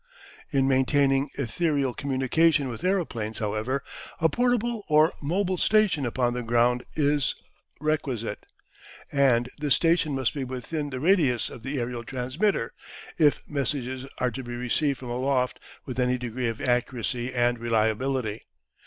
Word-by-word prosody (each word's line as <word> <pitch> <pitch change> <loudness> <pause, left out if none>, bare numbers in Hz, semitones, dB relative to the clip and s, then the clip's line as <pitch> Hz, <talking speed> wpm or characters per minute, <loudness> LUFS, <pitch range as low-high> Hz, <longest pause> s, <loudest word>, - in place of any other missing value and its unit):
In 135 -1 +2
maintaining 135 +1 +3
ethereal 140 0 0
communication 140 +2 +2
with 115 +4 -7
aeroplanes, 155 - -1
however, 110 +6 -2 0.4
a 160 -1 +4
portable 240 +1 0
or 155 +1 +4
mobile 180 +4 0
station 200 - +3
upon 120 0 0
the 125 - -2
ground 120 +1 +2
is 145 -2 +2 0.4
requisite, 135 -8 -2 0.6
and 130 -4 +3
this 145 -2 +3
station 165 -3 +2
must 130 -3 0
be 140 - -3
within 130 +4 -4
the 130 -2 -4
radius 150 - +2
of - - -10
the 135 +3 -3
aerial 120 0 -3
transmitter, 130 - -1 0.5
if 150 -3 +4
messages 135 -2 -3
are 125 -1 0
to 130 - -5
be 120 -1 -6
received 125 +3 0
from 125 -2 -7
aloft 125 0 0 0.3
with 130 -2 -5
any 125 0 +2
degree 125 0 -3
of 115 -1 -3
accuracy 125 -1 -1
and 120 -1 +1
reliability. 115 - 0
130 Hz, 140 wpm, -26 LUFS, 120-150 Hz, 0.6 s, a